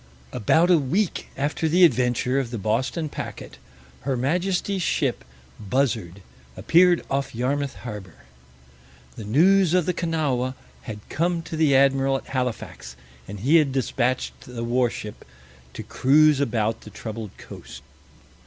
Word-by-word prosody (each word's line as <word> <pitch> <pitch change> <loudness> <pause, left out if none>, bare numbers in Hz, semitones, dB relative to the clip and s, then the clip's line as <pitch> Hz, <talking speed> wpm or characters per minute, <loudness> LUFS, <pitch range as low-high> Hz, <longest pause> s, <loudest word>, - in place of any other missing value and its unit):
About 160 - +3
a 170 - +6
week 170 +8 -1
after 150 +3 -1
the 180 +3 +4
adventure 125 -1 +1
of 130 -4 -3
the 120 - -5
Boston 120 - -1
packet - - -8 0.4
Her 135 -1 -2
Majesty's 180 +8 -1
ship - - 0 0.4
Buzzard 105 -5 -1 0.3
appeared 175 - +4
off 135 -3 -2
Yarmouth 135 +3 -1
harbor. 105 -8 -8 1.0
The 110 - -8
news 175 - +4
of 180 -3 +2
the 180 - 0
Kanawha 145 -7 -1 0.3
had 105 -1 -8
come 170 +1 -1
to 165 - -6
the 155 -3 +3
Admiral 135 0 +3
at - - -11
Halifax, 125 - -4 0.3
and 100 0 -8
he 145 +8 +5
had 150 -4 +2
dispatched 130 0 -1
the 120 -2 -6
warship 120 -3 -2 0.5
to - - -6
cruise 150 +2 +4
about 115 -5 -1
the - - -11
troubled 110 -2 -8
coast. - - -11
135 Hz, 135 wpm, -24 LUFS, 115-160 Hz, 1.0 s, a